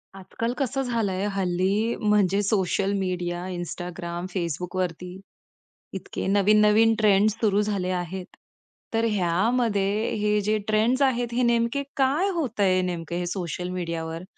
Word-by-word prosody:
आजकाल 230 +5 -4
कसं 270 0 -1
झालं 230 -6 -1
आहे, 190 +2 -2
हल्ली 195 +4 0
म्हणजे 205 -2 +3
सोशल 195 0 +1
मीडिया, 175 -2 -2
Instagram, 175 0 -5
Facebook 175 0 -3
वरती 180 +1 -3 0.7
इतके - - -5
नवीन-नवीन 210 +3 +4
ट्रेंड्स 210 0 +4
सुरू 205 -2 +3
झाले 200 -3 -1
आहेत. 180 +1 -6 0.7
तर 225 0 +2
ह्यामध्ये 210 +2 +1
हे 210 0 +2
जे 215 +2 +1
ट्रेंड्स 220 +5 +2
आहेत, 245 -3 +2
हे 250 +1 +1
नेमकं 235 +3 +1
काय 285 +8 +2
होत 260 -10 -3
आहे, 190 -2 +4
हे 185 - +2
नेमके 175 -1 -3
हे 180 - -2
सोशल 180 -1 -4
मीडियावर? 165 -2 -4
200 Hz, 140 wpm, -25 LUFS, 180-225 Hz, 0.7 s, नवीन-नवीन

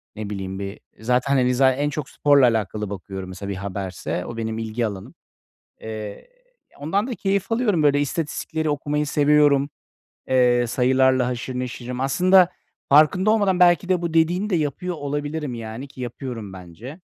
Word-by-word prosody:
ne 105 -1 -6
bileyim, 95 -1 -5
bir 100 0 -6 0.2
zaten, 125 +4 +1
hani, 125 0 +2
zaten 130 0 +3
en 145 +1 0
çok 145 -2 -5
sporla 145 -2 +4
alakalı 110 -3 0
bakıyorum, 95 -1 -7
mesela, 100 +2 -7
bir 100 - -3
haberse. 95 -3 -4
O 115 - -7
benim 110 -1 -3
ilgi 115 +1 -2
alanım. 100 -3 -7 0.7
Eee, 110 -2 -7 0.5
ondan 195 - -1
da 255 - -4
keyif 200 0 -1
alıyorum, 220 -8 +1
böyle. 145 -1 +3
İstatistikleri 160 +1 -2
okumayı 150 +1 -1
seviyorum. 145 -1 +3 0.6
Eee, 125 -2 +3
sayılarla 130 +1 +2
haşır 125 +1 -4
neşirim. 125 0 -5
Aslında 180 +7 +4 0.4
farkında 155 +8 +5
olmadan, 200 -4 +2
belki 175 +1 +5
de, 180 -2 +1
bu 170 -1 -3
dediğini 175 +6 +2
de 180 - +2
yapıyor 165 +4 -2
olabilirim, 145 -1 -3
yani, 115 +4 -7
ki 135 - -13
yapıyorum 120 -4 -6
bence. 95 - -10
130 Hz, 155 wpm, -22 LUFS, 110-155 Hz, 0.7 s, farkında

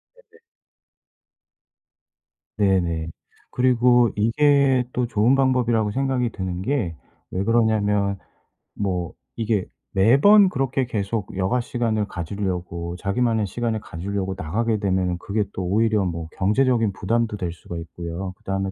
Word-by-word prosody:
네네. - - -24 2.2
네네. 90 -5 +1 0.4
그리고 125 -1 +4
이게 135 +3 +3
또 125 -1 0
좋은 115 +3 +3
방법이라고 120 -5 +2
생각이 130 -1 0
드는 95 -1 -4
게 105 - -1 0.4
왜 95 +2 -1
그러냐면 105 -3 +2 0.6
뭐 90 -4 -2 0.2
이게 110 -4 -1 0.2
매번 145 - +6
그렇게 135 -3 -1
계속 100 -2 -3
여가 95 +7 +1
시간을 115 -4 -1
가지려고, 90 -2 -4
자기만의 110 +3 0
시간을 110 +2 -2
가지려고 95 +3 -4
나가게 110 +6 -1
되면은 95 -3 0
그게 105 +4 -1
또 95 - -4
오히려 105 +2 +2
뭐 85 -2 -4
경제적인 115 +2 +2
부담도 115 +2 -1
될 90 -3 -3
수가 85 0 -8
있고요. 85 +3 -6
그다음에 95 0 -3
105 Hz, 280 characters per minute, -23 LUFS, 95-120 Hz, 2.2 s, 매번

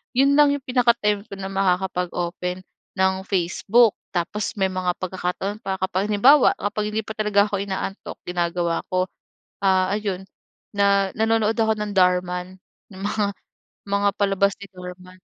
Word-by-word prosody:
yun 280 +2 +4
lang 285 -1 +5
yung 280 - -7
pinaka-time 235 -5 +1
ko - - -10
na 195 0 -6
makakapag-open, 180 -1 -1 0.3
ng 190 0 +1
Facebook. 195 +5 +3 0.2
Tapos 195 +6 -2
may 190 -2 0
mga 180 -1 -1
pagkakataon 185 +3 -3
pa, 190 -3 -3
kapag 190 +1 -1
halimbawa, 250 +8 +5
kapag 210 +1 -3
hindi 220 - 0
pa 220 - -8
talaga 210 -2 +2
ako 205 -2 -2
inaantok, 195 0 -4
ginagawa 175 -1 -1
ko, 185 0 +1 0.6
ah, 190 -1 +3
ayon, 190 -3 -4 0.5
na 200 -1 +3
nanonood 225 0 +2
ako 220 -1 +2
ng 210 -2 -4
Dhar 180 -1 +5
Mann, 180 +1 -6 0.3
ng 190 - -11
mga 205 0 -1 0.5
mga 200 0 +1
palabas 200 0 +1
ni 200 -1 -12
Dhar 180 0 -8
Mann. 185 0 -16
195 Hz, 155 wpm, -23 LUFS, 185-210 Hz, 0.6 s, lang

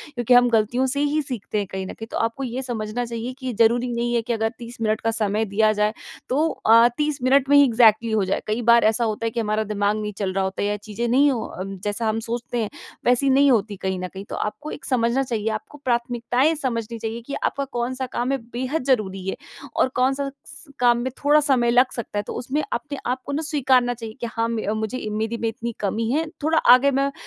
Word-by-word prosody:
क्योंकि 240 0 +2
हम 245 0 +6
गलतियों 235 +3 +2
से - - 0
ही 295 +1 +1
सीखते 250 -7 -5
हैं 205 -1 -1
कहीं 190 0 -4
न - - -6
कहीं 225 - -9
तो - - -3
आपको 230 +4 -1
ये 255 0 -3
समझना 240 -1 -3
चाहिए 235 +1 -5
कि 260 -2 -4
ज़रूरी 240 +2 +3
नहीं 240 0 -1
है 235 - +2
कि 235 +1 -2
अगर 225 0 0
30 235 0 -9
मिनट 215 -1 0
का 225 - +1
समय 215 -1 0
दिया 215 +2 +2
जाएँ 210 +1 +2 0.4
तो 300 +5 +2
अ, 230 -3 +5
30 300 -1 -1
मिनट 270 +1 +4
में 285 - +6
ही 285 - +8
एक्सजेक्टली 225 -2 +4
हो 215 -2 +2
जाएँ। 185 - -1
कई 215 +3 -1
बार 235 0 +5
ऐसा 220 +2 +2
होता 220 0 -2
है - - +1
कि 235 - -3
हमारा 215 -1 0
दिमाग 205 0 0
नहीं 210 0 -3
चल 190 -2 -2
रहा 195 0 0
होता 190 +1 -2
या 205 0 0
चीजें 215 +3 -4
नहीं 280 +4 +4
हो 240 -4 -2
अ, 185 - -6
जैसा 205 +3 -3
हम 220 +1 -1
सोचते 240 +1 -4
हैं 210 - -3 0.4
वैसी 250 +3 +3
नहीं 275 +1 +5
होती 210 -3 +1
कहीं 190 0 -2
न 185 - -3
कहीं। 195 +2 -9
तो - - -4
आपको 295 +8 -4
एक - - -8
समझना 250 +1 +1
चाहिए 225 -4 -2
आपको 220 +7 -6
प्राथमिकताएँ 245 +4 +1
समझनी 235 -5 -3
चाहिए 225 +1 -4
कि 280 - -4
आपका 280 - -1
कौन-सा 255 +2 -2
काम 245 +2 -1
है 275 - +1 0.2
बेहद 260 +5 -2
ज़रूरी 195 -7 0
है 190 - -1 0.4
और - - +3
कौन-सा 270 +2 +1 0.2
स 300 -1 -14
काम 240 -1 +4
में 250 +2 -2
थोड़ा 295 +1 +5
समय 260 -5 +2
लग 250 +2 +4
सकता 235 -3 -5
है - - -2
तो - - -4
उसमें 270 +5 -2
अपने 285 +4 -4 0.3
को - - -5
ना 290 +3 -1
स्वीकारना 260 -5 +2
चाहिए 225 -2 -8
कि 235 - -2
हाँ 230 0 0
म 230 -1 -2 0.2
मुझे 220 +3 -3
मेरी 220 +2 -2
में 230 - 0
इतनी 230 +1 -5
कमी 220 +3 -1
है। 310 +4 +1 0.2
थोड़ा 320 +2 +2 0.2
आगे 270 +3 +5
मैं 275 +1 +1
235 Hz, 240 wpm, -23 LUFS, 215-260 Hz, 0.4 s, ही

